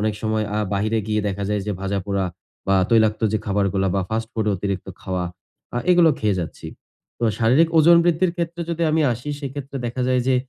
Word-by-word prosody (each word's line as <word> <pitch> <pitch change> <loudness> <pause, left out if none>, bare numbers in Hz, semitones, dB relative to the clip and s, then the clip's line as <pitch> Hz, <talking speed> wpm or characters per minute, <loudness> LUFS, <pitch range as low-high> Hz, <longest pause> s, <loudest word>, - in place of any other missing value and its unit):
অনেক 105 0 0
সময় 110 0 0
আ - - +1
বাহিরে 110 +3 0
গিয়ে 105 0 0
দেখা 100 +1 -3
যায় 105 -1 0
যে 105 - -1
ভাজাপোড়া 100 0 -1 0.4
বা 95 - +4 0.2
তৈলাক্ত 110 -2 +3
যে 110 - +2
খাবারগুলা 100 -1 +1
বা - - +2
ফাস্ট 110 0 -2
ফুড 110 -1 -2
এর - - +2
অতিরিক্ত 100 0 -3
খাওয়া 90 -1 -2 0.5
আ - - +2
এগুলো 175 -3 +6
খেয়ে 105 -3 +1
যাচ্ছি। 85 - -7 0.5
তো 120 - -1
শারীরিক 130 +9 +4
ওজন 170 +2 +7
বৃদ্ধির 175 +1 +2
ক্ষেত্রে 170 0 -3
যদি 170 0 -2
আমি 160 +1 +2
আসি 120 +6 -6
সেক্ষেত্রে 140 -1 -6
দেখা 125 +2 -3
যায় 130 -1 +2
যে 130 - +4
110 Hz, 200 wpm, -22 LUFS, 100-140 Hz, 0.5 s, ওজন